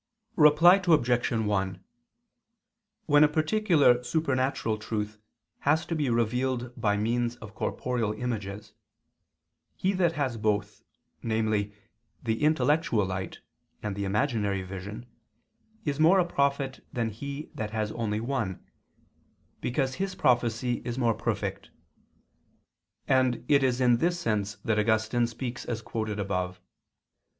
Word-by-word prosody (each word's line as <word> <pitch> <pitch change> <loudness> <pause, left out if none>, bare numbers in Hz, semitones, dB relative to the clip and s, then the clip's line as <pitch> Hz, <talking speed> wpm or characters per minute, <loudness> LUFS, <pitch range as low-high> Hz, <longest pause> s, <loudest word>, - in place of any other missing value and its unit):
Reply 165 +5 +7
Obj. 125 -7 +3
1: 95 -5 -1 1.2
When 145 -1 +6
a - - +7
particular 155 - +3
supernatural 130 -5 0
truth 105 0 -4 0.4
has 155 +4 +2
to - - -3
be 150 -5 0
revealed 120 +2 0
by 105 -2 +1
means 120 +2 0
of 110 -4 -11
corporeal 120 -1 -2
images, 105 -3 -5 1.0
he 190 +2 0
that 175 -3 +2
has 135 -6 -1
both, 105 -1 -1 0.4
namely 110 -2 0 0.5
the 110 -1 -1
intellectual 150 -6 +2
light 95 0 -5 0.4
and 105 -2 -3
the 100 - -3
imaginary 105 -2 0
vision, 100 +5 -7 0.8
is 145 0 -1
more 165 +5 +6
a 180 - +4
prophet 140 -4 -1
than 115 -2 -1
he 140 +7 -7
that 110 -1 -4
has 110 -1 -2
only 110 -2 -2
one, 115 -6 -3 1.0
because 130 +1 0
his 195 -1 -2
prophecy 120 -2 +1
is 120 0 -4
more 120 -3 +2
perfect; 105 -3 -3 1.4
and 130 -2 +2
it 145 -1 +5
is 130 -2 +1
in 120 -2 +4
this 175 +6 0
sense 105 - -1
that 110 -1 +2
Augustine 110 +2 +2
speaks 120 +2 -5
as 115 -2 -4
quoted 110 -2 -3
above. 90 -2 -2
120 Hz, 125 wpm, -28 LUFS, 105-140 Hz, 1.4 s, Reply